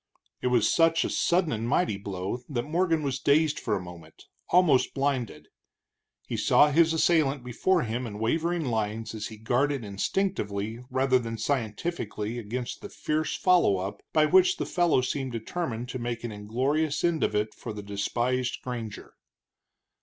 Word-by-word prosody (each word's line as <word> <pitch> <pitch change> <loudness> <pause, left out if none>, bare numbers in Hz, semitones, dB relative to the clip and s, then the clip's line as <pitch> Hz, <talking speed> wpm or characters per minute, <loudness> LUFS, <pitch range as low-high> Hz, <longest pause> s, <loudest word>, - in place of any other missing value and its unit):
It - - 0
was 120 -3 +3
such 165 -1 +3
a - - -2
sudden 175 -2 +2
and 115 +1 -2
mighty 160 - +2
blow 100 +3 -4
that 120 -5 -1
Morgan 165 +1 +1
was 135 -2 -2
dazed 150 +2 +3
for 110 - -1
a - - -1
moment, 85 -3 -12 0.3
almost 170 -7 +4
blinded. 135 -4 -2 0.8
He - - -4
saw 150 - +5
his 165 +2 +4
assailant 155 -5 +2
before 165 +9 +1
him 120 +2 -3
in 105 -2 -7
wavering 165 +9 0
lines 110 -2 -2
as 110 -1 -4
he 110 - -10
guarded 125 +3 0
instinctively 105 - -2
rather 130 0 +2
than 115 -2 -5
scientifically 115 -2 -2
against 120 +3 -5
the - - -8
fierce 155 +1 -2
follow 180 - +4
up 95 +2 -5
by 155 -1 +4
which 185 +4 +4
the - - -2
fellow 175 -7 +2
seemed 130 0 -3
determined 120 0 -4
to 130 - -4
make 120 -1 -4
an 120 - -4
inglorious 135 +9 -1
end 170 -2 +1
of - - 0
it 105 +1 0
for - - -7
the 105 -1 -7
despised 120 +5 -1
granger. 115 -5 -6
125 Hz, 165 wpm, -27 LUFS, 110-155 Hz, 0.8 s, saw